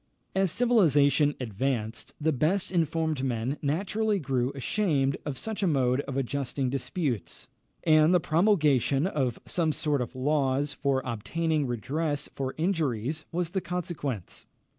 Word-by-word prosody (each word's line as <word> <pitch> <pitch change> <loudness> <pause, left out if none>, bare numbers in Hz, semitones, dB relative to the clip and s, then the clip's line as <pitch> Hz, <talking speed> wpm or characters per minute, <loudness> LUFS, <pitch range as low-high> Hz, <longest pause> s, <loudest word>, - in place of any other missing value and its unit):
As 190 -2 +2
civilisation 150 - +4
advanced, 115 -1 -3
the 160 +1 +2
best 160 +8 +1
informed 160 -4 0
men 125 +2 -1
naturally 200 +8 0
grew 130 -6 0
ashamed 140 -3 +1
of 140 -3 -3
such 220 -2 -4
a 195 - +2
mode 130 -4 +2
of 135 -2 -3
adjusting 135 0 -1
disputes, 135 - -3 0.4
and 155 +1 +5
the 180 - +5
promulgation 155 - +3
of 135 - -1
some 165 -3 0
sort 150 -3 0
of 120 +1 -5
laws 140 +1 +1
for 135 -2 0
obtaining 150 +6 -1
redress 145 +5 -2
for 135 -1 -3
injuries 155 - -1
was 170 0 -2
the 190 0 -1
consequence. 160 - -4
145 Hz, 135 wpm, -28 LUFS, 130-165 Hz, 0.4 s, and